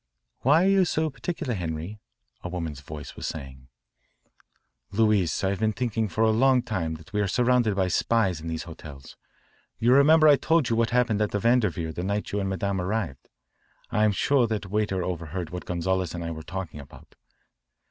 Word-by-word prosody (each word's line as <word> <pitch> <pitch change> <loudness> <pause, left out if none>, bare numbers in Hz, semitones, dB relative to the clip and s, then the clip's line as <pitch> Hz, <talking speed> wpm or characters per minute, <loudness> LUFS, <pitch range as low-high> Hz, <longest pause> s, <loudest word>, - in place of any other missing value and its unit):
"Why 150 +7 +4
are - - +4
you 195 -1 +5
so 160 -2 0
particular, 155 -2 -4
Henri?" 85 +2 -4 0.4
a 90 - -4
woman's 80 -5 -5
voice 75 +1 -9
was - - -5
saying. 65 -4 -8 1.2
"Louise, 105 -5 +2
I've 95 0 0
been 110 0 +1
thinking 115 -2 -1
for 110 +2 0
a 110 - +4
long 130 +2 +3
time 95 -9 -2
that 80 +5 -14
we 105 - +1
are 100 - +1
surrounded 120 -1 +2
by 95 -1 +1
spies 95 -3 +1
in 85 - -7
these 80 0 -3
hotels. 75 -5 -11 0.6
You 120 +2 +3
remember 155 +3 +6
I 145 -2 +7
told 160 -3 +2
you 115 - +1
what 115 0 +2
happened 120 -3 +1
at 105 - +1
the 105 - -2
Vanderveer 100 -8 +1
the 85 - -4
night 100 +3 -2
you 105 - -1
and 95 -1 -1
Madame 95 0 -1
arrived? 90 -7 -3 0.6
I'm 110 0 +3
sure 125 +4 +2
that 105 -4 -4
waiter 105 -3 0
overheard 85 -1 -4
what 90 0 -6
Gonzales 90 0 -1
and 85 - -4
I 85 - -4
were 80 -1 -6
talking 90 -2 -6
about." 70 - -14
100 Hz, 190 wpm, -26 LUFS, 85-115 Hz, 1.2 s, I